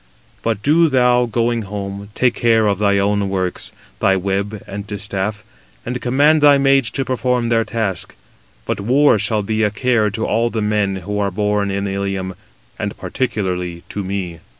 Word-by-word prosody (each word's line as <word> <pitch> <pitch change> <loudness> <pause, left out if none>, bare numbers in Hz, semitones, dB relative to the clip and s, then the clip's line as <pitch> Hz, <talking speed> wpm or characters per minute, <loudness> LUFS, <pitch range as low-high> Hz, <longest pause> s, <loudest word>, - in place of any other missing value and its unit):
But 110 -3 -2
do 160 +3 +4
thou, 125 -2 +3
going 115 0 0
home, 100 0 -6
take 125 -1 +2
care 115 -2 +3
of 100 -2 +1
thy 100 -1 +3
own 100 0 +1
works, 95 -2 -3 0.3
thy 95 - +3
web 100 +2 -2
and 100 +1 -7
distaff, 100 +1 -3 0.4
and 125 +1 -4
command 145 +5 +3
thy 145 -1 +7
maids 135 -3 +3
to 135 +4 -3
perform 125 -1 0
their 115 -1 +3
task; 110 -6 -3 0.5
but - - -2
war 125 +3 +4
shall 105 +1 0
be 110 +2 -1
a 105 - +3
care 110 0 +1
to 110 +3 -3
all 115 +2 +1
the 115 - -3
men 105 -2 0
who 105 +1 -2
are 100 -1 +1
born 105 +1 0
in 100 +1 -2
Ilium, 95 -1 -3 0.5
and - - -3
particularly 90 -8 -3
to 100 - -4
me." 95 -3 -4
105 Hz, 175 wpm, -19 LUFS, 100-120 Hz, 0.5 s, thy